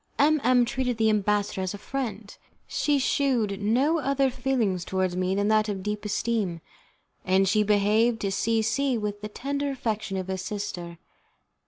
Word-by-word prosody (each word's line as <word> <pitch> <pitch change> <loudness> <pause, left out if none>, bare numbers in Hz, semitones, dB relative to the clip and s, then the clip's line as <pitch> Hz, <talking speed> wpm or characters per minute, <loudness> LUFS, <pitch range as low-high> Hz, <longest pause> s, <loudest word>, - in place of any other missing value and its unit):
M 300 +1 +4
M 245 0 +4
treated 250 -1 -2
the 220 -1 +3
ambassador 205 -1 0
as 185 +1 -3
a - - -7
friend. 220 -3 -5 0.3
She 295 -1 +1
shewed 245 -7 +1
no 260 +10 +2
other 275 -1 +1
feeling 250 -6 0
towards 185 +1 -1
me 185 +1 0
than 200 +1 +1
that 215 0 +3
of 195 -2 -4
deep 210 +1 -3
esteem, 210 -5 -1 0.6
and 190 +1 +3
she 215 +3 +3
behaved 210 +3 +2
to 195 - -1
C 225 +3 +1
C 255 +3 +1
with 205 -1 -4
the 210 - -5
tender 280 +5 -3
affection 220 -7 -3
of 185 -1 -4
a 190 0 -3
sister. 185 -4 -5
215 Hz, 170 wpm, -26 LUFS, 200-255 Hz, 0.6 s, M